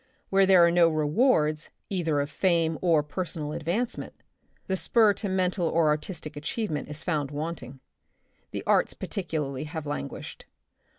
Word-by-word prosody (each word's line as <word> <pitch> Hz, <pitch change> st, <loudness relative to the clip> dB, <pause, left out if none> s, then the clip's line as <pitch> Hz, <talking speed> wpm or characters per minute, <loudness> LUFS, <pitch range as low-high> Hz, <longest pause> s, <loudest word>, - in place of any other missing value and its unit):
Where 195 Hz, 0 st, +5 dB
there 185 Hz, -3 st, +7 dB
are 170 Hz, -, +3 dB
no 170 Hz, -1 st, +5 dB
rewards 155 Hz, -, +2 dB, 0.2 s
either 165 Hz, -6 st, +1 dB
of 145 Hz, +1 st, -4 dB
fame 165 Hz, -4 st, +1 dB
or 165 Hz, -4 st, +3 dB
personal 155 Hz, -1 st, -4 dB
advancement, 180 Hz, +11 st, -3 dB, 0.5 s
the 190 Hz, -, -1 dB
spur 215 Hz, +2 st, +4 dB
to 200 Hz, 0 st, -4 dB
mental 185 Hz, -1 st, 0 dB
or 160 Hz, -1 st, +3 dB
artistic 150 Hz, +1 st, -3 dB
achievement 155 Hz, +2 st, -3 dB
is 150 Hz, +1 st, -7 dB
found 150 Hz, -5 st, -1 dB
wanting. 145 Hz, -4 st, -6 dB, 0.7 s
The -, -, -5 dB
arts -, -, +2 dB
par -, -, -7 dB
ticularly 150 Hz, -6 st, -3 dB
have 160 Hz, 0 st, -6 dB
languished. 145 Hz, -, -6 dB
165 Hz, 150 wpm, -27 LUFS, 150-185 Hz, 0.7 s, there